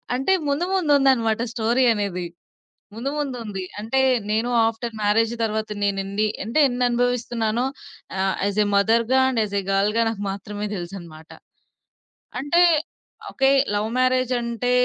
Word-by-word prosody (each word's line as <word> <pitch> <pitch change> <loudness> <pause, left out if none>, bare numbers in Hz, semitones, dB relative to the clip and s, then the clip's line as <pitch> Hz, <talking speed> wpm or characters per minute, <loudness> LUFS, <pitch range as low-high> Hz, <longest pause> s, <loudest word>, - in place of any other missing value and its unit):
అంటే, 270 +9 +1
ముందు 285 +5 0
ముందుందన్నమాట 270 -9 +3
స్టోరీ 235 +2 +1
అనేది 195 -4 -3 0.7
ముందు 240 +5 -3
ముందుముంది. 230 -9 -4 0.2
అంటే 230 +5 0 0.3
నేను 225 +3 0 0.2
ఆఫ్టర్ 225 +1 -3
మ్యారేజ్ 220 +2 +2
తరువాత 220 0 -2
నేనేన్ని 200 +1 0 0.2
అంటే 230 +9 +1
ఎన్ని 245 0 -1
అనుభవిస్తున్నానో 240 -1 0 0.5
ఆహ్, 190 0 0
as 205 +1 -2
a - - -2
మదర్‌గా 230 +5 +3
and 240 -4 0
as 205 -1 -4
a - - -8
గర్ల్‌గా 205 +4 +2
నాకు 220 -3 -4
మాత్రమే 205 +1 -5
తెలుసన్నమాట. 170 -3 -9 1.1
అంటే, 290 +6 +2 0.7
ఓకే 270 0 +2 0.3
లవ్ 210 +1 0
మ్యారేజ్ 255 0 +2
అంటే 235 +1 -2
225 Hz, 130 wpm, -22 LUFS, 205-250 Hz, 1.1 s, ముందుందన్నమాట